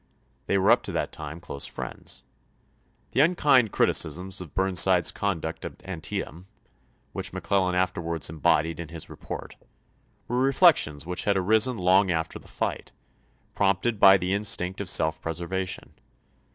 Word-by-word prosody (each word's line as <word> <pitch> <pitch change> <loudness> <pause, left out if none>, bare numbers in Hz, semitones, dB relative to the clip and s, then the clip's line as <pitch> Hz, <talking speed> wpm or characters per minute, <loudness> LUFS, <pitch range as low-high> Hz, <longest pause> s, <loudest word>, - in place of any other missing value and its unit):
They 100 - +2
were 100 +3 +4
up 120 - +5
to - - -2
that - - -2
time 80 +1 -7
close 70 -4 -3
friends. - - -6 0.9
The 135 - +3
un 170 +4 +3
kind 130 - +4
criticisms 90 +5 +1
of 85 -5 -11
Burnside's 95 -2 +3
conduct 85 -5 -3
at - - -9
Antietam, 85 0 -6 0.7
which - - -4
McClellan 95 -2 0
afterwards 85 -3 -1
embodied 80 +1 0
in 85 -3 -6
his 85 -1 -8
re - - -9
port, - - -8 0.7
were 125 +1 -1
reflections 135 - +3
which 90 +1 -2
had 100 -1 +2
arisen 110 +6 +2
long 95 +1 +3
after 80 -2 -2
the - - -18
fight, - - -4 0.6
prompted 100 +3 0
by 95 -1 +8
the 90 +1 -2
instinct 100 -2 -1
of 100 - -4
self 80 -2 +1
preserva 85 +3 -3
tion. - - -6
95 Hz, 150 wpm, -26 LUFS, 85-100 Hz, 0.9 s, by